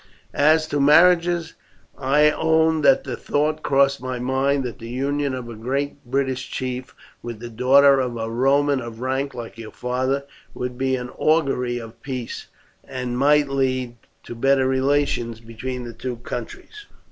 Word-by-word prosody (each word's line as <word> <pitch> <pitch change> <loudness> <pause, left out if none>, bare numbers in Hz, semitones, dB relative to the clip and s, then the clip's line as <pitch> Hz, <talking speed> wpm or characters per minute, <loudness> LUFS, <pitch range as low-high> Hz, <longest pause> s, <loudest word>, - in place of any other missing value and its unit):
As 155 +2 +4
to 145 - -1
marriages, 170 +3 +4 0.4
I 145 +3 +3
own 160 0 +2
that 270 - +4
the - - -4
thought 155 +1 -1
crossed 140 -1 +2
my 130 0 -4
mind 135 +2 0
that 120 -5 -6
the 115 - -8
union 140 +2 -1
of 125 -2 -6
a 120 - -7
great 140 +6 -3
British 130 0 -2
chief 130 0 -5 0.3
with 120 -2 -6
the 120 0 -8
daughter 135 +4 +5
of 125 -2 -2
a 115 0 -3
Roman 135 +3 +2
of 115 -1 -8
rank 130 +2 -2
like 115 -1 -8
your 110 -1 -7
father 130 +3 -2 0.3
would 125 0 -4
be 130 +1 0
an 125 0 -6
augury 135 -6 +1
of 115 -1 -10
peace, 130 -4 -6 0.4
and 125 -1 -5
might 145 +3 +4
lead 130 -3 -1 0.3
to - - -8
better 135 +2 +2
relations 130 -3 0
between 115 +3 -6
the 120 -1 -7
two 120 +2 -5
countries." 410 - -8
130 Hz, 160 wpm, -22 LUFS, 125-145 Hz, 0.4 s, daughter